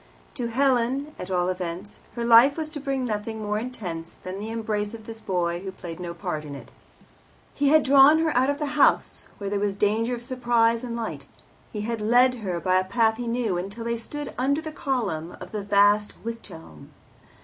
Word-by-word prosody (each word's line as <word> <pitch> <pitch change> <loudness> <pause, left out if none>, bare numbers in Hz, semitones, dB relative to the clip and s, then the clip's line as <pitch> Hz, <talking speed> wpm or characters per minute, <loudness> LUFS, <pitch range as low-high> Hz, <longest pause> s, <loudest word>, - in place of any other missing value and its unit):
To 245 -4 -3
Helen, 265 +3 +1
at 180 - -6
all 180 -1 +1
events, 185 +2 -5 0.2
her 235 -1 -2
life 235 +5 +7
was 315 -1 -3
to 310 -1 -6
bring 270 -2 -2
nothing 220 0 -3
more 210 0 -1
intense 185 -9 -6
than 185 +1 -5
the 215 +2 -5
embrace 215 -1 -2
of 220 -1 -12
this 225 0 -9
boy 175 -2 -1
who 190 0 -5
played 175 -2 -9
no 170 -1 -5
part 170 -4 -4
in 145 -2 -7
it. 140 - -11 0.8
He 285 - +1
had 310 +1 +5
drawn 280 +3 +7
her 320 -1 +1
out 260 +2 +3
of 285 - 0
the 295 -1 -3
house, - - +3
where 200 -1 -5
there 205 - 0
was 200 -1 0
danger 220 +4 +1
of 240 - -6
surprise 240 -2 +1
and 235 -2 -4
light; 230 -2 -5 0.4
he 210 - -4
had 225 +1 -3
led 245 +4 +4
her 180 -4 -2
by 185 +1 +2
a - - 0
path 220 +3 +2
he 240 0 -4
knew, 230 -6 0
until 200 +5 -6
they 235 0 -1
stood 290 +5 -6
under 280 +4 +2
the 315 -1 -6
column 230 - -3
of - - -10
the 210 - -3
vast 205 +1 +3
wych 230 0 -6
elm. 80 - -12
225 Hz, 210 wpm, -25 LUFS, 195-250 Hz, 0.8 s, life